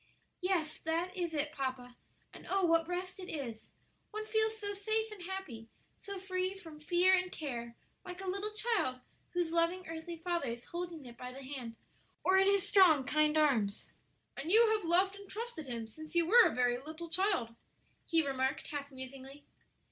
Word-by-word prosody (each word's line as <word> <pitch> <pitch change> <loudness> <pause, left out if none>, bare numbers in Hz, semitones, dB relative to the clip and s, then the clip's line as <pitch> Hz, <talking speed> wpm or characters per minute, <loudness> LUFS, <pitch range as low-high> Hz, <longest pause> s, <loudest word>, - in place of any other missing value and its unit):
"Yes, 360 -4 0
that 335 +3 -1
is 345 -3 -2
it, 295 0 0
papa; 255 -4 -4 0.4
and - - -12
oh, 390 -1 +3
what 330 -1 +3
rest 365 +2 -4
it 370 - -7
is! 240 -8 -5 0.4
One 430 0 -5
feels 440 0 +1
so 405 -2 -3
safe 435 +2 0
and 415 -3 -9
happy; 350 -12 -6 0.3
so 400 -1 -7
free 370 0 -2
from 325 -5 -11
fear 355 +4 +4
and 365 0 +2
care; 235 -6 -5 0.3
like 360 0 -8
a 385 - -6
little 400 +3 -1
child 425 - 0 0.3
whose 350 -2 0
loving 340 +2 +1
earthly 325 +1 -6
father 340 -3 -1
is 235 0 -5
holding 345 -4 -5
it 240 -1 -11
by 250 0 -5
the 270 +2 -9
hand 255 -4 -6 0.5
or 375 - +4
in 385 - +5
his 400 -1 +3
strong, 340 -8 +6
kind 305 +3 +2
arms." 235 -10 +2 0.4
"And 290 +5 -4
you 450 +1 +7
have 430 -4 +1
loved 380 +3 +4
and 400 -1 -12
trusted 430 - -5
Him 235 -2 -3
since 310 +9 -11
you 340 -1 +4
were 465 +7 +8
a - - -3
very 245 -1 +2
little 315 +5 -7
child," 370 - +1 0.5
he 330 -2 +3
remarked, 270 +1 -1
half 285 -1 -4
musingly. 265 +2 -9
335 Hz, 185 wpm, -34 LUFS, 275-380 Hz, 0.5 s, were